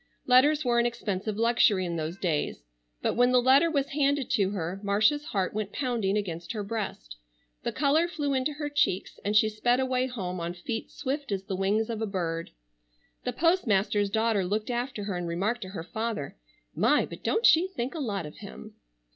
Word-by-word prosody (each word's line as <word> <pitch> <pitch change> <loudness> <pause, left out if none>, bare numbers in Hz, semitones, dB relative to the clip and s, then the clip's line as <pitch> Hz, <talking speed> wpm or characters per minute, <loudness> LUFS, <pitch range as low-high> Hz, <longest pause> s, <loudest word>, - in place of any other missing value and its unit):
Letters 285 +4 +5
were 240 -1 +3
an 235 - +3
expensive 210 -3 -3
luxury 225 -4 +3
in 170 -1 -3
those 160 +2 -3
days. 155 - -2 0.4
But - - +1
when 245 +1 +3
the 250 - +5
letter 265 +6 +5
was 280 -3 0
handed 285 -2 +1
to 195 -3 +2
her, 185 -1 -4
Marcia's 210 +9 +2
heart 195 - -1
went 210 -1 -3
pounding 230 -7 0
against 170 -3 -4
her 210 -2 -3
breast, 195 - -5 0.4
the - - -2
color 305 +4 +2
flew 295 -5 -2
into 265 +3 0
her 295 0 -4
cheeks, 290 -10 0
and 205 +1 -1
she 215 +1 +6
sped 240 +4 +1
away 260 -1 +1
home 185 -8 -4
on 170 +1 -4
feet 225 +6 -5
swift 280 -2 -4
as 195 -1 -1
the 195 -1 -4
wings 200 +4 +1
of 225 -2 -4
a 220 - -1
bird. 170 -4 -3 0.8
The - - -1
postmaster's 210 - +2
daughter 220 -1 +1
looked 210 +6 -2
after 240 -2 -3
her, 200 -2 -3
and 175 -1 -3
remarked 200 +8 -1
to 185 - -6
her 180 -4 -6
father: 220 -5 -4 0.4
"My, 295 - +3
but - - -11
don't 450 - +1
she 325 +4 +6
think 265 -9 -4
a 325 - -5
lot 200 - -2
of 150 - -10
him!" - - -10
220 Hz, 195 wpm, -28 LUFS, 190-260 Hz, 0.8 s, she